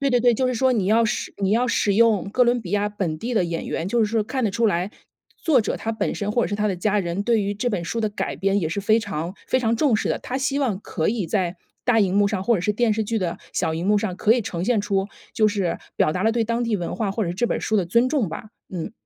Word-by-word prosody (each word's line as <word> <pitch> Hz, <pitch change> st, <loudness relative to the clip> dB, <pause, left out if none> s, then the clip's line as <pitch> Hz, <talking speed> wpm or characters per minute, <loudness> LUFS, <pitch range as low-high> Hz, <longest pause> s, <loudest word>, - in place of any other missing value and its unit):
对 280 Hz, -, +2 dB
对 245 Hz, -, +3 dB
对， 245 Hz, 0 st, +4 dB
就 255 Hz, +3 st, +1 dB
是 255 Hz, -, 0 dB
说 260 Hz, +2 st, +2 dB
你 210 Hz, -6 st, 0 dB
要 225 Hz, +3 st, +4 dB
使 220 Hz, -, -2 dB
你 195 Hz, -1 st, 0 dB
要 240 Hz, +4 st, +2 dB
使 205 Hz, -, +2 dB
用 220 Hz, -3 st, +3 dB
哥 250 Hz, -, +4 dB
伦 245 Hz, 0 st, +3 dB
比 180 Hz, -, -8 dB
亚 205 Hz, 0 st, +1 dB
本 185 Hz, -7 st, -3 dB
地 240 Hz, +6 st, -3 dB
的 200 Hz, -, +3 dB
演 170 Hz, -1 st, -3 dB
员， 165 Hz, -, -3 dB
就 235 Hz, +5 st, 0 dB
是 -, -, +3 dB
说 225 Hz, -1 st, +1 dB
看 255 Hz, +4 st, -3 dB
得 215 Hz, -, +1 dB
出 230 Hz, +3 st, +1 dB
来， 180 Hz, 0 st, 0 dB, 0.5 s
作 295 Hz, -7 st, +3 dB
者 215 Hz, -, -2 dB
他 225 Hz, -, -3 dB
本 220 Hz, -, -2 dB
身 205 Hz, 0 st, -2 dB
或 240 Hz, -, +2 dB
者 -, -, +1 dB
是 205 Hz, -, -2 dB
他 210 Hz, +1 st, 0 dB
的 195 Hz, -, 0 dB
家 210 Hz, +4 st, 0 dB
人， 180 Hz, 0 st, -2 dB
对 225 Hz, -1 st, +2 dB
于 200 Hz, +1 st, -1 dB
这 210 Hz, +5 st, -1 dB
本 195 Hz, -7 st, -2 dB
书 230 Hz, +7 st, -2 dB
的 215 Hz, -, +1 dB
改 205 Hz, -, -3 dB
编 195 Hz, +1 st, +1 dB
也 160 Hz, -, 0 dB
是 170 Hz, +6 st, -2 dB
非 215 Hz, +3 st, +3 dB
常 170 Hz, -4 st, -4 dB
非 255 Hz, -, +1 dB
常 230 Hz, -1 st, +1 dB
重 270 Hz, -1 st, +3 dB
视 215 Hz, -, 0 dB
的。 -, -, 0 dB
他 260 Hz, +2 st, -4 dB
希 275 Hz, +1 st, 0 dB
望 230 Hz, -9 st, 0 dB
可 175 Hz, -3 st, -1 dB
以 215 Hz, -6 st, -2 dB
在 180 Hz, 0 st, 0 dB, 0.3 s
大 245 Hz, -3 st, +4 dB
荧 195 Hz, -1 st, +2 dB
幕 205 Hz, -, +4 dB
上， 200 Hz, -2 st, -1 dB
或 235 Hz, +4 st, +3 dB
者 180 Hz, -, -1 dB
是 210 Hz, -, +1 dB
电 220 Hz, 0 st, +2 dB
视 220 Hz, 0 st, -1 dB
剧 225 Hz, +2 st, -1 dB
的 175 Hz, -4 st, -2 dB, 0.2 s
小 160 Hz, -2 st, 0 dB
荧 170 Hz, +3 st, -3 dB
幕 210 Hz, +1 st, +4 dB
上， 200 Hz, -4 st, -3 dB
可 215 Hz, -, +4 dB
以 245 Hz, -, +2 dB
呈 175 Hz, -5 st, -4 dB
现 230 Hz, 0 st, +2 dB
出 200 Hz, -1 st, 0 dB, 0.3 s
就 220 Hz, -3 st, +4 dB
是 200 Hz, -5 st, 0 dB, 0.2 s
表 155 Hz, -, +2 dB
达 185 Hz, -, -1 dB
了 225 Hz, +2 st, +3 dB
对 230 Hz, -1 st, +1 dB
当 230 Hz, +2 st, -1 dB
地 230 Hz, -2 st, 0 dB
文 175 Hz, -, -4 dB
化 215 Hz, -4 st, -1 dB
或 220 Hz, +3 st, -2 dB
者 185 Hz, -, -1 dB
是 175 Hz, -, -3 dB
这 240 Hz, +6 st, 0 dB
本 -, -, -1 dB
儿 -, -, -7 dB
书 220 Hz, -, 0 dB
的 190 Hz, -, +2 dB
尊 235 Hz, +8 st, +2 dB
重 270 Hz, -6 st, +1 dB
吧。 165 Hz, -, -6 dB, 0.3 s
嗯。 170 Hz, +3 st, -4 dB
210 Hz, 335 characters per minute, -23 LUFS, 190-230 Hz, 0.5 s, 对